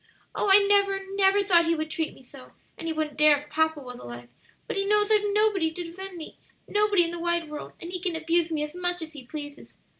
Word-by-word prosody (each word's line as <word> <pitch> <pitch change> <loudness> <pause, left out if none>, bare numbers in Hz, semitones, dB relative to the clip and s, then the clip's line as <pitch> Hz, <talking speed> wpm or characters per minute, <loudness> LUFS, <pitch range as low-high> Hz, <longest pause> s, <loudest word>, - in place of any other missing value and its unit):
"Oh, 410 - -1
I 400 +1 +7
never, 400 -1 +3
never 395 0 +3
thought 345 -4 +4
he 335 - +2
would 310 0 -4
treat 320 0 -3
me - - -17
so! 255 +1 -15 0.2
and 330 - -7
he - - -1
wouldn't 310 -2 -3
dare 300 -1 +6
if 295 +1 -12
papa 315 0 +1
was 250 -2 -9
alive; 120 0 -10 0.4
but - - -5
he 395 - 0
knows 420 +1 +2
I've 425 -1 +6
nobody 410 -5 +2
to 350 +2 -6
defend 365 +2 -8
me 320 - -10 0.3
nobody 415 -3 +3
in 335 - -3
the 345 - -6
wide 340 -2 -1
world, 300 - -7
and 340 - -8
he 365 - -4
can 355 -2 -2
abuse 330 +1 +1
me 305 -2 -1
as 300 0 -6
much 355 -1 -1
as 315 0 -10
he 285 -4 -10
pleases. 290 -1 -9
335 Hz, 245 wpm, -26 LUFS, 305-390 Hz, 0.4 s, I